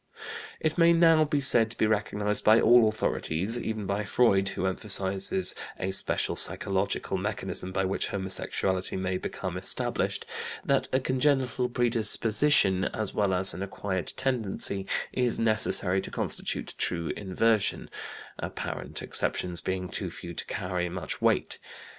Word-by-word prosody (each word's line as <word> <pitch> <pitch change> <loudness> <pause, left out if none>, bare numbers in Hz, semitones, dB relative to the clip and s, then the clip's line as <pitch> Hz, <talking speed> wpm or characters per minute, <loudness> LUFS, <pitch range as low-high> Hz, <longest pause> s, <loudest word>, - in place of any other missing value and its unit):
It 155 +2 -1
may 170 0 +6
now 165 -2 +5
be 150 -1 0
said 120 -4 +5
to 115 - -9
be - - +2
recognized 105 -1 -1
by 110 +2 +6
all 120 -1 +6
authorities, 110 0 -2
even 110 -3 -4
by 100 +2 -1
Freud 100 -3 +2
who 95 - -3
emphasizes 95 -1 +2 0.3
a 95 - -2
special 95 - +2
psychological 95 0 +1
mechanism 95 - -4
by 95 0 0
which 95 - -1
homosexuality 95 -1 -2
may 95 0 -2
become - - -5
established, - - 0 0.4
that 140 -1 +1
a 130 - +2
congenital 130 -1 0
predisposition 115 -3 +2
as 110 -3 -3
well 100 -2 +1
as 95 +1 +1
an - - -7
acquired 95 -3 -4
tendency 100 -6 -1 0.3
is 125 -2 0
necessary 105 -4 +2
to - - -8
constitute - - -4
true 85 -2 -1
inversion, 105 +2 0 0.5
apparent - - -5
exceptions 90 -1 0
being 95 -1 -3
too 90 0 -3
few 85 +1 -8
to - - -5
carry 90 -1 -3
much 90 +1 -5
weight. - - +1
100 Hz, 140 wpm, -27 LUFS, 95-120 Hz, 0.5 s, may